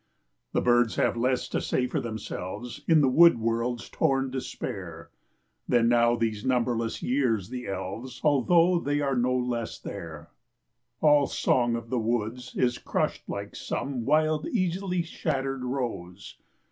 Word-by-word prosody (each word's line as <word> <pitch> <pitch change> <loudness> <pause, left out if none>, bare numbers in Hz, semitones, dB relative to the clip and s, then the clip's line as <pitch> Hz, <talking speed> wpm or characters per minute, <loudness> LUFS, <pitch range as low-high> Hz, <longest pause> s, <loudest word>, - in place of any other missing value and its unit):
The - - +1
birds 120 -1 +3
have - - +1
less 125 +2 0
to - - -1
say 125 - 0
for - - -2
themselves, 110 0 -6
In 160 -2 +5
the 140 - +4
wood 165 +2 +6
world's 115 +1 -1
torn 135 -4 0
despair, 90 -10 -6 0.6
Than 115 -1 +3
now 120 0 +4
these 110 -2 -2
numberless 120 -3 0
years 120 -7 0
the 125 -1 -6
elves, 100 +6 -5
Although 165 +5 +4
they 145 -2 -1
are 135 -2 0
no 125 +1 +1
less 120 -2 -2
there; 80 -3 -8 0.7
All 150 -2 +5
song 120 -2 +1
of 115 -1 -6
the 125 - +1
woods 120 +2 -2
is 125 -1 0
hushed - - -2
like 100 0 -5
some 135 -4 -3
Wild, 155 +3 +2
easily 185 -3 -1
shattered 135 -5 -3
rose. 120 -8 -5
125 Hz, 145 wpm, -27 LUFS, 115-135 Hz, 0.7 s, wood